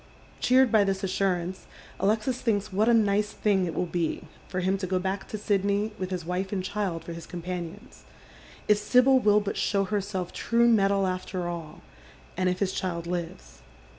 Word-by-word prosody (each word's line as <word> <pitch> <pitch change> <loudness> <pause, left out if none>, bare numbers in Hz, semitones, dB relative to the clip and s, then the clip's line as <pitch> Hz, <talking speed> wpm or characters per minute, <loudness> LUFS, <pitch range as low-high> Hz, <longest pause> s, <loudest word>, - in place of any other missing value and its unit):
Cheered 255 0 +4
by 215 -3 +5
this 195 -1 -1
assurance, 185 -1 -1 0.3
Alexis 215 +6 0
thinks 205 -4 0
what 215 +4 +3
a - - +6
nice 210 -1 +2
thing 195 -4 +1
it 165 - -4
v>'ill 180 - -2
be 175 -1 -1 0.2
for 185 -1 -3
him 190 +2 +1
to 185 - -3
go 185 +1 0
buck 190 +2 -3
to 215 - -5
Sidney 205 +1 0
with 185 -1 -3
his 180 -3 -4
wife 180 +2 -2
and 190 -3 -2
child 185 -4 -2
for 170 - -7
his 165 -1 -9
companions, 180 +4 -7 0.6
if 210 -1 +4
Sibyl 260 +3 +5
will 210 -3 +4
but 205 -1 -4
show 200 -1 +1
herself 195 -2 -3
true 235 0 +2
metal 200 -3 +3
after 185 -1 -3
all, 165 -3 -6 0.5
and 185 0 +1
if 180 - -1
his 190 -1 -1
child 170 -2 -3
lives. 165 - -6
195 Hz, 185 wpm, -27 LUFS, 180-210 Hz, 0.6 s, a